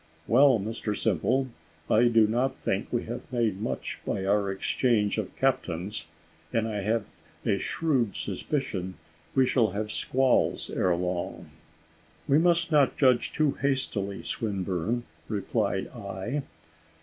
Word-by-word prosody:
"Well, 130 +1 +6
Mr 105 0 -3
Simple, 130 +1 +1 0.4
I 115 +3 +4
do 115 -2 +5
not 125 +5 0
think 95 +2 -2
we 120 - 0
have 120 +2 -7
made 115 -6 0
much 110 - -3
by 95 - -2
our 100 0 +2
exchange 105 +2 +1
of 105 - -5
captains; 105 -7 -1 0.4
and 115 -1 +1
I 105 -2 -2
have 110 +1 0 0.4
a - - +2
shrewd 135 -10 0
suspicion 95 -3 -3 0.4
we 130 -1 +5
shall 115 -6 +2
have 105 +1 -3
squalls 130 -1 +1
ere 90 -2 +2
long." 90 0 -3 0.8
"We 140 +2 +5
must 170 0 +2
not 145 -4 +4
judge 130 -4 +3
too 155 -2 +2
hastily, 110 -8 -1
Swinburne," 100 +2 -2 0.3
replied 100 -2 -1
I. 115 +4 -4
115 Hz, 130 wpm, -28 LUFS, 100-130 Hz, 0.8 s, Well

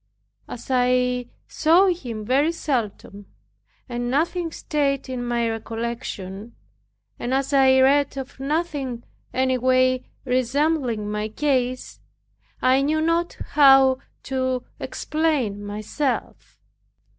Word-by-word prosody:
As 245 - -8
I 250 -1 +2 0.2
saw 335 +5 +4
him 240 -12 -4
very 275 +7 +2
seldom, 225 -10 -4 0.6
and 240 -1 -3
nothing 330 +5 0
stayed 280 -4 -1
in 250 -1 -3
my 240 -1 0
recollection, 225 -2 -5 0.6
and 250 +2 -1
as 275 +1 -1
I 265 -1 +5
read 280 +1 +3
of 270 0 -7
nothing 275 -4 -2 0.3
any 260 0 +1
way 255 0 +3 0.2
resembling 255 -3 0
my 210 0 -2
case, 255 0 -1 0.6
I 260 +1 +4
knew 305 +3 +1
not 335 +2 0
how 270 -2 +6 0.2
to 260 -1 -1 0.2
explain 290 -11 -1
myself. 215 +7 -4
260 Hz, 105 wpm, -23 LUFS, 240-285 Hz, 0.6 s, how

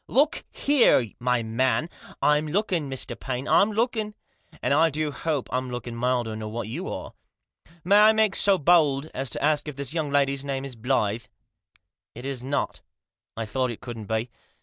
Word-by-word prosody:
" - - -54
Look 300 +2 -1
here, 250 - +3
my 125 -1 +1
man! 120 +5 +1 0.2
" - - -18
"I'm 150 +1 +3
looking, 175 -4 0
Mr. 130 -1 -4
Paine, 130 +1 -4
I'm 205 +2 +4
looking; 220 -1 -1 0.4
and - - +1
I 160 +3 +5
do 155 0 -2
hope 150 -2 -2
Pm 130 0 -1
looking 120 -1 -5
milder 120 -2 0
nor 110 0 -6
what 115 -1 -4
you 160 - -5
are. - - -6 0.7
May 200 +4 +5
I 215 +1 +8
make 220 -2 +2
so 200 -1 +4
bold 155 -3 +3
as 135 0 -2
to - - -2
ask 150 0 +2
if 150 - -5
this 140 +1 -3
young 160 -3 -1
lady's 140 -1 +1
name 135 -1 -3
isBlyth?" 115 -4 -1 0.5
" - - -39
It 120 +3 -8
is 135 -3 -3
not" 140 +2 -2 0.3
" - - -52
I 115 - -2
thought 130 +3 -1
it 115 - -6
couldn't 115 -4 -7
be. 110 +2 -2
135 Hz, 195 wpm, -25 LUFS, 120-160 Hz, 0.7 s, I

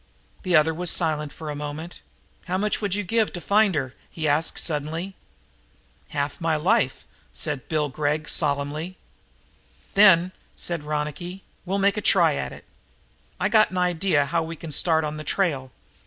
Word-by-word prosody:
The 180 -2 +1
other 155 +1 +5
was 175 +2 -1
silent 150 -4 +1
for 155 -2 -7
a - - -5
moment. 150 +4 -6 0.4
"How 185 0 -1
much 210 +3 0
would 200 -2 0
you 205 - -1
give 220 +3 +1
to 175 - -4
find 205 0 +3
her?" 130 -3 -2 0.2
he 155 -2 -3
asked 150 +3 +1
suddenly. 160 +4 -2 1.0
"Half 145 +2 -3
my 165 -1 +2
life," 185 +10 +1 0.3
said - - -4
Bill 155 -3 +1
Gregg 150 +2 -1
solemnly. 150 +4 -1 1.0
"Then," 185 -3 +6 0.2
said 170 -3 -3
Ronicky, 150 +5 -4 0.2
"we'll 195 +2 0
make 200 +1 +2
a - - 0
try - - +4
at - - -3
it. - - -12 0.7
I - - +2
got 215 -1 +5
an 185 - -5
idea 180 -4 +2
how 165 +4 0
we 165 +1 -5
can 160 0 -8
start 160 +2 +2
on 150 0 -3
the 155 - -6
trail. 145 -6 -1
160 Hz, 170 wpm, -24 LUFS, 150-185 Hz, 1.0 s, Then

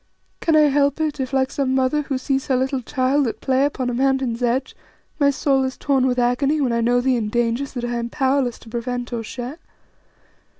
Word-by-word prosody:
Can 325 - +2
I 310 - +7
help 285 0 +2
it 305 -2 -1
if, 260 -1 -3
like 265 -1 +1
some 265 -2 0
mother 265 +3 +2
who 275 -2 -3
sees 270 +1 -1
her 265 - +2
little 260 +1 0
child 265 +2 +1
at 225 - -4
play 265 +1 +2
upon 270 -3 -2
a 245 - -1
mountain's 260 -2 0
edge, 245 +2 0 0.4
my 285 -1 +4
soul 275 -1 +1
is 260 0 -3
torn 270 -2 +1
with 250 -1 0
agony 250 +5 +1
when 255 -5 +1
I 235 - +1
know 245 +1 +2
thee 255 0 +2
in 215 -2 -2
dangers 240 +4 -1
that 245 -2 -3
I 240 0 -2
am 235 0 -3
powerless 265 -2 0
to 225 - -13
prevent 245 +1 -4
or 235 - -2
share? 250 +7 -7
260 Hz, 220 wpm, -21 LUFS, 245-275 Hz, 0.4 s, I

